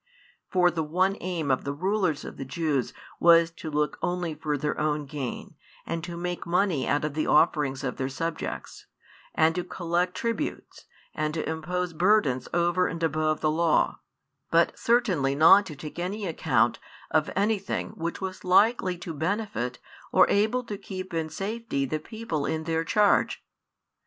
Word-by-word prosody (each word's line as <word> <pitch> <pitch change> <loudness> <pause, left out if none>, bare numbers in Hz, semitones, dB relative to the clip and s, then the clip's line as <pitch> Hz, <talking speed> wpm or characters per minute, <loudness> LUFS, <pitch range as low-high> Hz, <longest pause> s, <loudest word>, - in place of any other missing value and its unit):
For 180 -1 +4
the 165 - -2
one 185 +5 +1
aim 170 -5 -1
of 130 - +1
the 140 - -3
rulers 185 -2 0
of - - -8
the 135 - -4
Jews 140 0 -1 0.3
was 170 0 +6
to 165 -1 -7
look 150 0 -1
only 175 -2 -1
for 150 -1 -2
their 150 +2 -2
own 150 -1 0
gain, 135 -3 -6 0.3
and 165 -1 -3
to 175 -1 -6
make 175 0 -4
money 175 -5 +1
out 145 +1 +1
of 150 - -3
the 155 +1 -1
offerings 150 -4 +3
of 125 - -3
their 130 -1 -2
subjects, 165 +4 -5 0.5
and 160 0 +4
to 180 - -2
collect 175 0 -1
tributes, 230 +9 -4 0.3
and 155 0 -2
to 160 - -2
impose 175 +2 -2
burdens 175 - +2
over 175 +1 +2
and 165 0 -5
above 155 -1 +1
the 155 - +2
law, 155 - +2 0.5
but 170 +1 +3
certainly 185 - +2
not 190 +7 +7
to 155 - -7
take 150 +4 -8
any 200 +4 -3
account 165 -3 +1 0.3
of 155 0 +2
anything 205 +1 0
which 170 0 -5
was 190 -1 -5
likely 185 0 +3
to 170 -1 -6
benefit 160 - -2 0.3
or - - +6
able 220 +5 +2
to 205 -4 -6
keep 185 -2 -7
in 160 -1 -1
safety 205 -7 -3
the 155 +4 -2
people 165 -5 -4
in 160 0 -2
their 165 0 0
charge. 205 +4 +2
165 Hz, 165 wpm, -27 LUFS, 150-185 Hz, 0.5 s, not